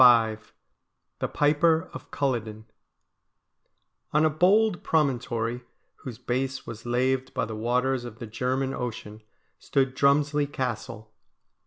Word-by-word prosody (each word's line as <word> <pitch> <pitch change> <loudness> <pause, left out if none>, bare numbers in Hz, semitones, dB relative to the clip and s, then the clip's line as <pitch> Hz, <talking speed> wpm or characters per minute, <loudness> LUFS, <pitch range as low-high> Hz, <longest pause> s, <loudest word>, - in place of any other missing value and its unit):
55 115 -3 +6
V - - -27 0.7
THE - - -1
PIPER 160 +2 +2
OF - - -9
CULLODEN 110 -6 -2 1.5
On 150 +1 +4
a 155 - +3
bold 190 +5 +3
promontory 125 -5 0 0.3
whose 125 -4 -8
base 130 +2 -2
was 115 +1 -8
laved 130 +2 0
by - - 0
the 110 - -6
waters 125 +3 0
of 120 -2 -8
the 115 - -7
German 130 +4 -1
Ocean 110 -4 -5 0.4
stood 135 -2 0
Drumslie 145 +1 +2
Castle. 115 -4 -4
130 Hz, 125 wpm, -26 LUFS, 115-140 Hz, 1.5 s, 55